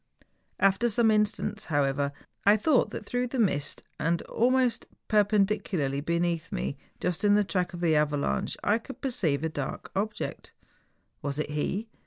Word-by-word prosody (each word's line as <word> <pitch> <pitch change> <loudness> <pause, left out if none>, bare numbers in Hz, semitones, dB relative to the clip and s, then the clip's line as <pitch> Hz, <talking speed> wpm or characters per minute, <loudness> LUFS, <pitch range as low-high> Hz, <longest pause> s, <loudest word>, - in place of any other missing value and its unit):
After 195 +5 +3
some 225 0 +3
instants, 210 0 0
however, 140 -2 +1 0.3
I 205 +2 +6
thought 260 +4 +3
that - - -7
through 245 +3 -1
the 260 - -4
mist, 145 - 0 0.2
and 165 +1 0
almost 250 -1 +1 0.2
perpendicularly 200 -9 +2
beneath 170 +1 -1
me, 65 +3 -2 0.2
just 180 0 -1
in 205 0 +5
the 210 - +4
track 180 -2 -1
of 175 - -7
the 165 -3 +3
avalanche, 145 - 0
I 210 +3 +3
could 270 +4 -10
perceive 170 - 0
a - - +2
dark 145 -3 -5
object. 210 +2 -3 0.7
Was 140 -1 -2
it 150 -1 -2
he? 190 +9 -2
195 Hz, 155 wpm, -28 LUFS, 150-215 Hz, 0.7 s, I